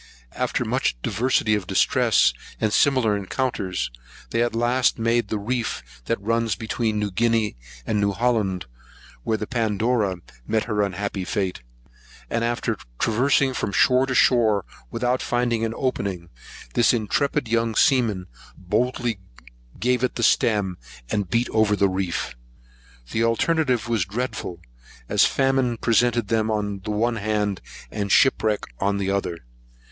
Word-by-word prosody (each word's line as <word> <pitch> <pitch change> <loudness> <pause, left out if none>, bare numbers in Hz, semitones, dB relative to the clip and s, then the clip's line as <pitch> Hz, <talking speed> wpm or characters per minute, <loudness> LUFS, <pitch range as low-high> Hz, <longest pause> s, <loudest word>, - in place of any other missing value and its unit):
After - - -1
much - - 0
diversity 115 -2 +1
of 105 -3 -1
distress, - - +3 0.3
and 110 -1 0
similar 130 -7 +3
encounters, 95 - -2 0.4
they - - +1
at 120 -1 0
last 120 +2 +2
made 115 -1 +1
the 110 - -2
reef 100 - -4
that 115 - -1
runs 115 0 0
between 110 +1 -2
New 105 -1 -1
Guinea 115 0 +1 0.3
and 105 -1 0
New 100 0 +2
Holland, 100 -4 0 0.6
where 110 - 0
the 105 - -4
Pandora 110 -2 0 0.3
met 110 0 +1
her 105 -3 -1
unhappy 100 0 -2
fate; 95 -2 -2 0.7
and 115 0 0
after 115 -1 -1 0.2
traversing 130 - +2
from 105 - -2
shore 130 +6 +4
to 130 - -1
shore, 110 -6 +4 0.2
without 125 +2 0
finding 120 -2 0
an 115 0 -2
opening, 95 -9 -2 0.4
this 120 +1 +4
intrepid 140 +4 0
young 115 0 0
seaman 115 -9 +3 0.3
boldly 115 +3 -1 0.6
gave 125 +1 +1
it 125 - 0
the 115 - -2
stem, 105 -5 +2 0.3
and 100 -4 -1
beat 115 +4 +1
over 110 -1 +3
the 100 -1 +3
reef. 95 -7 -2 0.8
The 115 - +1
alternative 125 0 +1
was 115 -6 +1
dreadful, 110 -4 -4 0.5
as - - +4
famine 135 -3 +1
presented 120 -1 +2
them 110 -1 +1
on 105 -2 -1
the 95 - -8
one 115 +3 0
hand, 105 -2 -1 0.3
and 100 -2 -3
shipwreck 110 -5 +3 0.2
on 100 +1 +1
the 95 -1 -1
other. 90 -7 -3
110 Hz, 140 wpm, -23 LUFS, 100-120 Hz, 0.8 s, shore